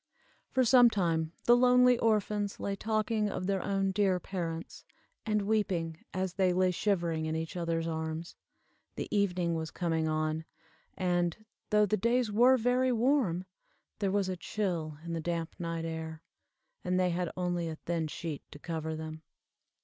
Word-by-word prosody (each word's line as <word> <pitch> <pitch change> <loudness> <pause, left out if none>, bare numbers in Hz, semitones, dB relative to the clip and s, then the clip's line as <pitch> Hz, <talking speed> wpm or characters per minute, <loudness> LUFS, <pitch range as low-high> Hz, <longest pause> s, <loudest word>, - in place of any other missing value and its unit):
For 260 - +2
some 245 0 +7
time 165 -6 0
the 240 - +7
lonely 250 0 +6
orphans 210 -2 +1
lay 200 - -2
talking 215 0 0
of 185 - -3
their 195 -1 0
own 195 0 0
dear 190 -2 +2
parents, 165 -3 -5 0.4
and 210 -1 +1
weeping, 185 -6 -1
as 185 -1 -2
they 190 -2 +2
lay 185 0 +3
shivering 170 -4 0
in 160 - -1
each 160 +1 -4
other's 165 -1 -1
arms. 160 +1 -4 0.6
The - - -4
evening 180 -4 +1
was 160 -1 -2
coming 165 -2 -1
on, 155 0 -1 0.5
and, 175 +2 0 0.2
though 210 0 +4
the 215 +1 +1
days 235 +2 +1
were 245 +5 +6
very 250 +2 +2
warm, 235 - +2 0.5
there 200 -2 +1
was 195 0 +1
a 185 - -2
chill 170 -5 -3
in 170 - -4
the 165 - -2
damp 165 0 -2
night 165 -1 -3
air, 160 0 -5 0.6
and 180 0 +1
they 180 -1 +2
had 175 0 -1
only 175 -2 -1
a 160 - -4
thin 165 0 -2
sheet 155 -1 -5
to - - -11
cover 160 0 -4
them. 155 0 -6
180 Hz, 165 wpm, -31 LUFS, 165-210 Hz, 0.6 s, some